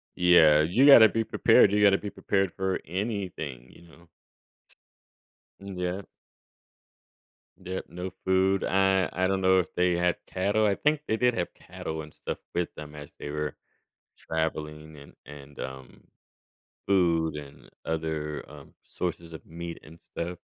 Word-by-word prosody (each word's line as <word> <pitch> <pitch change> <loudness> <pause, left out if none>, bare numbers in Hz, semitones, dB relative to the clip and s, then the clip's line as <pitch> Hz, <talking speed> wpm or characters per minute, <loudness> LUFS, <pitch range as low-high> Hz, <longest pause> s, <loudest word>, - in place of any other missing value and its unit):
Yeah, 80 -4 +6
you 95 - +3
gotta 120 -6 +9
be 115 0 0
prepared. 100 - +4
You 105 0 +2
gotta 100 -1 +6
be 105 - -6
prepared 95 -2 -1
for 95 0 -1
anything, 90 - -4
you - - -17
know? 85 +1 -19 1.5
Mm 100 -1 -8
Yep. 90 +2 -3 1.6
Yep, 95 +1 -5
no 90 +2 -6 0.2
food, 95 +1 +2
I 95 0 +2
I 95 +1 +1
don't 95 0 0
know 95 0 +4
if 90 - -3
they 90 0 +2
had 90 0 +1
cattle. 100 +3 0
I 100 - +3
think 150 +4 +1
they 110 - 0
did 125 0 +2
have 85 - -3
cattle 80 0 -7
and 75 0 -12
stuff - - -6 0.2
with 90 -1 -1
them 75 -1 -9
as 75 -1 -10
they 75 - -6
were 75 -1 -3 0.6
traveling 75 -1 -4
and 70 0 -14
and, 70 -1 -12
um, 65 0 -9 0.8
food 85 -5 +2
and 70 -1 -11 0.2
other, 80 -2 -3
um, - - -14
sources 85 -2 -5
of 80 - -10
meat 85 +1 -7
and 80 +2 -15
stuff. 85 +1 -6
90 Hz, 150 wpm, -27 LUFS, 80-95 Hz, 1.6 s, gotta